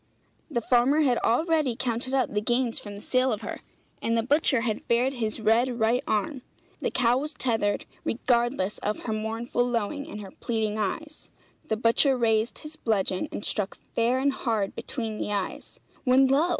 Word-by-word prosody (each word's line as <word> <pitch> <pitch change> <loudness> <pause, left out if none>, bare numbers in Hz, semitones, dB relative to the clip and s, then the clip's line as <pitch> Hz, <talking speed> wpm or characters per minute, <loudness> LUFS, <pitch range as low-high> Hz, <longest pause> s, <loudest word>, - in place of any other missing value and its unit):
The 240 -6 -1
farmer 255 +6 +3
had 255 -5 +3
already 305 0 +2
counted 250 +2 -1
up 260 -5 +1
the 210 - +1
gains 240 +1 +1
from 205 -1 -8
the 205 - -10
sale 255 0 +2
of 215 - -2
her, - - -5 0.4
and 230 0 +1
the 225 - +1
butcher 275 -1 +3
had 225 -3 -2
bared 245 +3 +2
his 225 -4 -2
red 235 +3 +2
right 235 +4 +2
arm. 235 +6 -1 0.4
The - - 0
cow 245 0 +3
was 300 +2 -4
tethered, 220 -5 0 0.2
regardless 235 -4 0
of 210 +1 -2
her 220 - -3
mournful 225 +3 -1
lowing 245 +4 -2
and 210 - -6
her 195 -2 -9
pleading 220 -2 -2
eyes; 295 +10 -4 0.4
the 220 - 0
butcher 240 +4 +3
raised 225 -1 +1
his 310 0 -8
bludgeon 195 -4 0
and - - -5
struck 205 -2 -1 0.2
fair 235 +2 +2
and 275 +1 +2
hard 220 -7 -1
between 220 -4 -4
the - - -2
eyes 200 -2 -4 0.2
when 260 +1 +5
lo! 280 +6 +3
235 Hz, 180 wpm, -27 LUFS, 220-260 Hz, 0.4 s, when